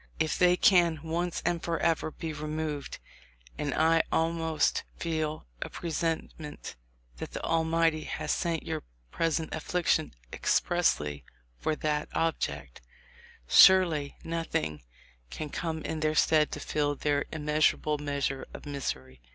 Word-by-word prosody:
If 160 0 +1
they 180 0 +4
can 175 -5 +5
once 170 +2 -2
and 175 -1 +1
forever 165 -1 0
be 160 0 -6
removed 150 -1 -4 0.6
(and 145 -1 -1
I 165 +1 +4
almost 160 -1 +1
feel 155 - -2 0.2
a - - -3
presentiment 165 -2 -4 0.4
that - - -7
the - - -5
Almighty 165 -1 +1
has - - -3
sent 165 -2 -1
your - - -3 0.3
pres 165 0 +1
ent 160 - -6
affliction 160 - 0 0.2
expressly 75 - +1 0.4
for 155 - 0
that 150 -1 -1
object), 165 - -2 0.7
surely 165 - +6
noth 165 0 -4
ing 75 -2 -1 0.5
can 155 - -5
come 160 -2 -3
in 160 - -3
their 155 0 +1
stead 155 0 +4
to - - -4
fill 145 0 -1
their 145 0 0
immeasur 150 -1 +2
able 150 -1 -2
measure 140 -2 -2
of - - -10
misery 65 - -5
155 Hz, 135 wpm, -29 LUFS, 150-165 Hz, 0.7 s, surely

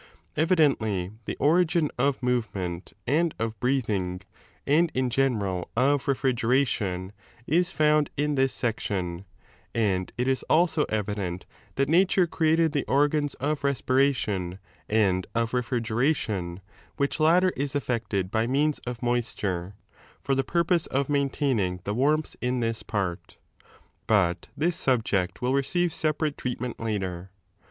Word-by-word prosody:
* - - -38
Evidently 135 - +2
the - - -4
origin 165 +1 +3
of 135 +1 0
movement 100 -8 -2
and 160 +5 +1
of 110 -2 -3
breathing, 105 -9 0 0.5
and 160 +4 +3
in 130 -1 0
general 105 -9 0
of 140 +3 +2
refrigeration, 120 -8 0 0.3
is 175 +5 +2
found 150 -1 +3
in 150 +1 +1
this 135 -1 +2
section, 95 -6 -2 0.5
and 95 -5 0
it 125 +1 0
is 130 -1 +1
also 160 -2 +3
evident 100 -4 -2 0.3
that 135 0 +1
nature 180 +3 +4
created 160 -1 +2
the 145 -2 0
ot^ns 145 +1 +1
of 145 +1 -2
respiration 130 -9 +1 0.3
and 95 -4 +2
of 115 0 0
refrigeration, 115 - -1 0.4
which 140 +2 -1
latter 180 +4 +4
is 140 0 -3
effected 110 -8 -1
by 110 +1 +1
means 145 +4 +1
of 125 0 -5
moisture, 105 -6 -2 0.4
for 135 - -1
the 135 0 +1
purpose 170 +3 +1
of 140 +1 -1
maintaining 135 -10 0
the 100 - -2
warmth 150 +6 +1
in 125 0 0
this 115 -1 -1
part.* 95 -5 -4 0.7
But 95 -6 +2
this 165 +3 +1
subject 110 - 0
will 125 +1 +1
receive 175 +6 +1
16 - - -7
separate 155 -1 -2
treatment 125 -1 -4
later. 95 -5 -3
125 Hz, 130 wpm, -26 LUFS, 105-145 Hz, 0.7 s, nature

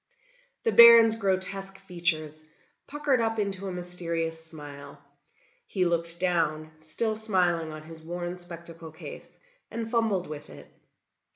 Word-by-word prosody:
The 455 - +2
Baron's 235 -1 +9
grotesque 195 -2 -1
features 170 -5 -3 0.4
puckered 285 -4 +1
up 225 0 0
into 200 -2 -2
a - - -3
mysterious 170 -2 -3
smile; 145 -3 -11 0.7
he 185 -3 0
looked 170 0 +2
down, 160 -4 0
still 215 +8 -1
smiling 180 -7 0
on 155 0 -9
his 160 0 -12
worn 175 +2 -5
spectacle 170 -2 -10
case 160 +3 -11 0.3
and 225 0 -5
fumbled 220 -6 +1
with 150 -1 -8
it. - - -12
175 Hz, 125 wpm, -27 LUFS, 160-200 Hz, 0.7 s, Baron's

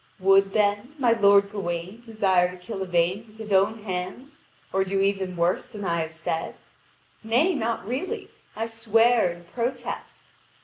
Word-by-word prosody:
Would, 195 +1 +4
then, 210 +6 +1
my 250 -4 +3
lord 200 -2 +5
Gawain 185 +1 -4
desire 195 -6 +2
to 180 - -10
kill 195 +2 -7
Yvain 180 +3 0
with 215 0 -19
his 215 -2 -4
own 205 +3 +2
hands, 190 +9 -6 0.3
or 195 0 +3
do 195 +1 -1
even 195 -2 0
worse 170 +2 +1
than 205 -2 -7
I 170 -1 0
have 160 0 -4
said? 160 0 -4 0.7
Nay, 250 +12 +3
not 230 - -2
really, 260 +10 -4 0.2
I 225 - -2
swear 225 -1 +3
and 175 0 -9
protest. 245 +2 -4
200 Hz, 160 wpm, -25 LUFS, 185-225 Hz, 0.7 s, lord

